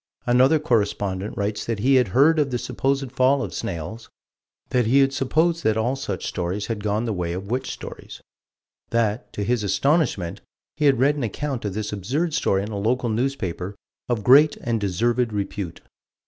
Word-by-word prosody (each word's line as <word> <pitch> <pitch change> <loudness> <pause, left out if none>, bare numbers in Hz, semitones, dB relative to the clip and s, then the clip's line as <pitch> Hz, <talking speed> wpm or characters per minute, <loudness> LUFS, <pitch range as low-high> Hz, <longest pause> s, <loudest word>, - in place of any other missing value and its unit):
Another 130 +5 +4
correspondent 105 -8 -1
writes 105 +1 -2
that 115 -2 -2
he 130 +7 +2
had 125 -3 +4
heard 145 - +4
of 145 -2 +2
the 125 - -1
supposed 135 +1 -1
fall 135 +1 +3
of - - -5
snails: 110 +2 -5 0.6
that 125 -3 +1
he 130 +5 +4
had 135 0 +4
supposed 160 +6 +1
that 110 0 +2
all 120 +4 0
such 100 -8 -4
stories 90 +3 -2
had 110 -3 -4
gone 105 +2 0
the 115 - -1
way 85 -2 -2
of 95 +4 -6
witch 130 +1 -1
stories; - - -8 0.7
that, 110 -2 0
to 105 - -3
his 120 +1 0
astonishment, 120 - +1 0.3
he 150 - 0
had 140 -2 +5
read 140 +4 +3
an 140 - -2
account 125 +2 -3
of 100 -2 -3
this 105 -1 -3
absurd 135 - -1
story 95 -7 +1
in 105 - -5
a 100 - -3
local 120 +4 0
newspaper 110 -6 -2 0.3
of 115 -4 -1
"great 145 +6 +6
and 115 -2 -2
deserved 115 +5 +1
repute." 100 -3 -4
115 Hz, 185 wpm, -23 LUFS, 100-135 Hz, 0.7 s, great